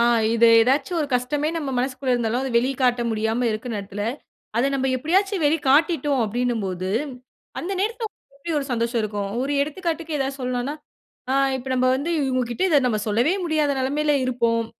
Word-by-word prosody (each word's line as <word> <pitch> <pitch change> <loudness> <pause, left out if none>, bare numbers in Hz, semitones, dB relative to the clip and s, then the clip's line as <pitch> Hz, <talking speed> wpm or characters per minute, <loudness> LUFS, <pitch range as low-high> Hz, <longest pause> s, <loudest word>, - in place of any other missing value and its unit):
ஆ 235 - +5 0.3
இது 230 0 +5
ஏதாச்சு 270 +9 +2
ஒரு 295 - 0
கஷ்டமே 290 +5 0
நம்ம 295 -4 -3
மனசுக்குள்ள 255 0 -1
இருந்தாலும் 235 +1 0
அத 270 - -2
வெளிக்காட்ட 250 -1 +1
முடியாம 220 +2 0
இருக்க 215 +3 -4
நேரத்தில, 205 0 -5 0.5
அத 240 - +3
நம்ம 265 -1 0
எப்படியாச்சு 380 - +1
வெளி 295 +2 +4
காட்டிட்டோம் 290 -2 +3
அப்படின்னும் 240 +1 -1
போது, 185 0 -3 0.7
அந்த 365 +4 -3
நேரத்தில 445 +2 -1 0.3
எப்படி 315 +3 -4
ஒரு 280 - -3
சந்தோஷம் 235 0 0
இருக்கும். 205 -2 -3
ஒரு 280 - -1
எடுத்துக்காட்டுக்கு 325 0 -3
ஏதாவது 270 0 -2
சொல்லலானா, 250 +2 -2 0.6
ஆ - - +2 0.2
இப்ப 260 +1 -7
நம்ம 255 0 +2
வந்து 290 +5 -3
இவங்ககிட்ட 255 +2 -1
இத 295 -4 +4
நம்ம 215 -4 0
சொல்லவே 240 - +2
முடியாத 310 -3 +1
நெலைமையில 295 +3 +1
இருப்போம். 235 -2 0
260 Hz, 165 wpm, -23 LUFS, 235-295 Hz, 0.7 s, ஆ